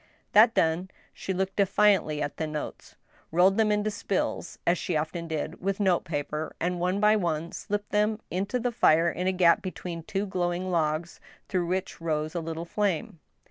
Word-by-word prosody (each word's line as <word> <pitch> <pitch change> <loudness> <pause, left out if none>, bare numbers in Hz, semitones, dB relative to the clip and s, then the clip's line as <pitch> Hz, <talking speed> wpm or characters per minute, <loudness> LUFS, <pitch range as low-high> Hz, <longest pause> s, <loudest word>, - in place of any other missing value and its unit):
That 225 +3 +6
done, 165 +3 +1 0.2
she - - -5
looked 190 +1 -2
defiantly 195 -6 +3
at 145 - -5
the 160 - -2
notes, 150 -1 -6 0.4
rolled 185 +4 +4
them 220 -1 +3
into 210 +1 +1
spills, 205 -2 -2
as 175 +1 +2
she 175 - -2
often 165 +2 -3
did 160 +1 -4
with 195 +1 -1
note 190 -4 +2
paper, 150 -1 -3
and 175 +1 -1
one 180 +3 0
by 210 +1 +5
one 170 -4 -1
slipped 205 0 -4
them 210 +1 +2
into 200 +7 -1
the 245 +1 -1
fire 170 -7 +4
in 180 +1 -3
a - - +4
gap 180 -2 +4
between 180 -2 -5
two 195 +5 -2
glowing 175 -2 -1
log^ 165 -1 -1 0.3
through 180 -3 -1
which 185 -1 -3
rose 155 -1 -1
a 175 - -1
little 165 0 -5
flame. 175 -4 -1
180 Hz, 180 wpm, -27 LUFS, 165-200 Hz, 0.4 s, That